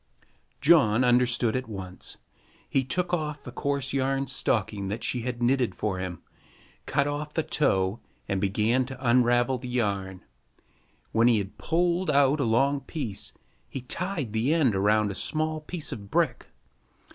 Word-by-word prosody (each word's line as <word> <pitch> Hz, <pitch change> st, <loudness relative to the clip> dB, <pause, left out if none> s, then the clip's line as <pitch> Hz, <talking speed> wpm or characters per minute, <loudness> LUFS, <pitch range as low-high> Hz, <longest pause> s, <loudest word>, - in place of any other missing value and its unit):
John 135 Hz, -7 st, +5 dB
understood 120 Hz, -1 st, +3 dB
at 130 Hz, -2 st, -3 dB
once. 95 Hz, -3 st, -6 dB, 0.5 s
He 135 Hz, -, +1 dB
took 180 Hz, +7 st, -1 dB
off 150 Hz, -3 st, -2 dB
the -, -, -8 dB
coarse 140 Hz, -2 st, -2 dB
yarn 135 Hz, 0 st, 0 dB
stocking 110 Hz, -6 st, -1 dB
that 105 Hz, +4 st, -4 dB
she 125 Hz, -, 0 dB
had 120 Hz, 0 st, -3 dB
knitted 125 Hz, -5 st, +2 dB
for 95 Hz, 0 st, -2 dB
him, 90 Hz, -2 st, -5 dB, 0.6 s
cut -, -, +2 dB
off 150 Hz, +1 st, -4 dB
the 160 Hz, -, +1 dB
toe, 95 Hz, -9 st, +1 dB, 0.3 s
and 95 Hz, -1 st, -1 dB
began 110 Hz, +6 st, +2 dB
to 130 Hz, 0 st, -6 dB
unravel 120 Hz, +1 st, +3 dB
the 125 Hz, 0 st, -7 dB
yarn. 100 Hz, -6 st, -2 dB, 0.9 s
When 115 Hz, +1 st, +4 dB
he 120 Hz, -2 st, +5 dB
had 100 Hz, -1 st, -5 dB
pulled 175 Hz, +2 st, +1 dB
out 140 Hz, +1 st, +4 dB
a 140 Hz, -, +1 dB
long 135 Hz, +5 st, +2 dB
piece, 130 Hz, -, -3 dB, 0.4 s
he 135 Hz, -, -5 dB
tied 150 Hz, -, -2 dB
the 115 Hz, +6 st, +1 dB
end 135 Hz, -11 st, +3 dB
around 105 Hz, +1 st, +2 dB
a -, -, -4 dB
small 155 Hz, +8 st, -1 dB
piece 160 Hz, +1 st, -5 dB
of 100 Hz, -2 st, -7 dB
brick. -, -, 0 dB
125 Hz, 155 wpm, -27 LUFS, 105-140 Hz, 0.9 s, John